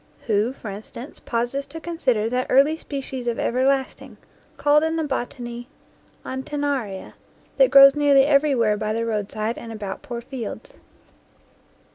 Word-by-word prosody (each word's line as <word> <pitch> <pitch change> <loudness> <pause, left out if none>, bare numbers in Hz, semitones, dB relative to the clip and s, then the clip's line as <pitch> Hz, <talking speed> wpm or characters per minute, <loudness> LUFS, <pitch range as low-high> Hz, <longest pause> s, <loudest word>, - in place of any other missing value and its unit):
Who, 215 +1 +1
for 230 -6 -8
instance, 225 +7 -9
pauses 245 +4 -2
to 325 +3 -8
consider 260 -11 0
that 250 +2 -1
early 280 +4 +4
species 270 -5 -6
of 235 - -1
everlasting, 265 +2 -1 0.4
called 295 +1 +4
in 320 0 0
the 325 - -1
botany 245 -3 -5 0.6
Anten 265 +3 -4
naria, 250 -10 -3 0.4
that - - +5
grows 275 0 +9
nearly 285 -2 +4
everywhere 275 -7 +3
by 215 0 -2
the 230 +1 -1
roadside 215 +1 -3
and 230 - -9
about 205 -3 -6
poor 240 -1 -6
fields? 240 -2 -8
255 Hz, 140 wpm, -23 LUFS, 230-280 Hz, 0.6 s, grows